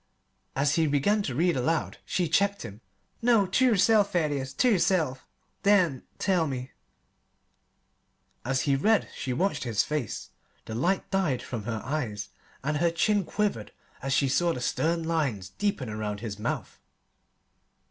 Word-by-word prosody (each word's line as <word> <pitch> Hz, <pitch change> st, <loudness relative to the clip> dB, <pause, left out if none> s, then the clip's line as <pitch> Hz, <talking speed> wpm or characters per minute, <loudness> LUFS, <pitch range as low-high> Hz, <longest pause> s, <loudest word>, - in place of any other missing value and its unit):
As 140 Hz, +1 st, +2 dB
he 160 Hz, -1 st, +3 dB
began 150 Hz, +9 st, +2 dB
to 130 Hz, -11 st, -3 dB
read 170 Hz, +4 st, +2 dB
aloud 155 Hz, +6 st, -1 dB
she 180 Hz, -2 st, 0 dB
checked 200 Hz, +5 st, +1 dB
him. 105 Hz, +3 st, -9 dB, 0.4 s
"No; 230 Hz, -4 st, +4 dB
ter 200 Hz, +8 st, +2 dB
yerself, 215 Hz, -2 st, +4 dB
Thaddeus 145 Hz, -6 st, 0 dB
ter 250 Hz, -, +2 dB
yerself! 170 Hz, -, +1 dB, 0.3 s
Then 185 Hz, -10 st, +3 dB, 0.2 s
tell 180 Hz, -4 st, +1 dB
me." 130 Hz, -1 st, -5 dB, 1.7 s
As 130 Hz, +1 st, 0 dB
he 140 Hz, -2 st, +2 dB
read 210 Hz, +10 st, +2 dB
she 130 Hz, -, -3 dB
watched 185 Hz, +11 st, 0 dB
his 115 Hz, -5 st, +1 dB
face. 150 Hz, -8 st, -4 dB, 0.3 s
The 110 Hz, -, -6 dB
light 175 Hz, +12 st, 0 dB
died 180 Hz, -10 st, 0 dB
from 115 Hz, -4 st, -5 dB
her 110 Hz, -2 st, -3 dB
eyes 120 Hz, -8 st, -3 dB, 0.3 s
and 150 Hz, +2 st, 0 dB
her 170 Hz, +2 st, +3 dB
chin 200 Hz, +4 st, +2 dB
quivered 200 Hz, -, -2 dB, 0.3 s
as 135 Hz, -, -3 dB
she 135 Hz, +1 st, +3 dB
saw 170 Hz, +6 st, +2 dB
the -, -, -5 dB
stern 165 Hz, +6 st, 0 dB
lines 140 Hz, -, -1 dB
deepen 200 Hz, -, -2 dB
around 105 Hz, -1 st, -4 dB
his 105 Hz, -3 st, -5 dB
mouth. -, -, -4 dB
155 Hz, 150 wpm, -27 LUFS, 125-190 Hz, 1.7 s, No